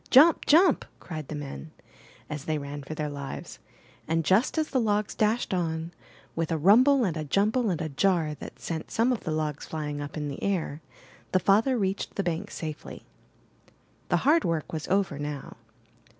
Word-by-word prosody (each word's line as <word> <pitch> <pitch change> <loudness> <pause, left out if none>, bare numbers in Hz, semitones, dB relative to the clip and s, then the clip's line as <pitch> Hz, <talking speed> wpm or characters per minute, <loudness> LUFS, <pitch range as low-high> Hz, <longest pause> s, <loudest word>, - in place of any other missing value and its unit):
''Jump! 305 +6 +7
Jump!'' 330 +1 +5
cried 155 -5 -7
the 155 - -5
men, 145 +2 -7 0.6
as 150 -2 -6
they 155 -1 0
ran 145 0 -6
for 150 +3 -7
their 150 -1 -2
lives; 140 -2 -7 0.5
and, 165 0 0
just 210 - +3
as 310 -1 +1
the 260 - +2
logs 210 -1 0
dashed 220 0 +1
on, 165 -2 -1 0.4
with 165 0 -1
a 165 - +1
rumble 245 - +6
and 180 -7 0
a 155 - -3
jumble 210 - +2
and 170 -4 -1
a 160 - -2
jar 160 +1 +1
that 150 - -9
sent 160 -2 -4
some 235 +3 +2
of 235 - -5
the 160 - -1
logs 155 -2 -2
flying 150 -2 -4
up 145 +2 -6
in 150 -1 -2
the 140 - -6
air, 170 -6 -1 0.5
the 185 - +5
father 220 +8 +3
reached 195 -2 -2
the 200 - 0
bank 175 +3 -2
safely. 155 -2 -7 1.0
The - - +3
hard 315 +3 +5
work 165 -2 -2
was 155 -1 -4
over 190 -7 +1
now. 145 -1 -5
165 Hz, 185 wpm, -27 LUFS, 150-210 Hz, 1.0 s, Jump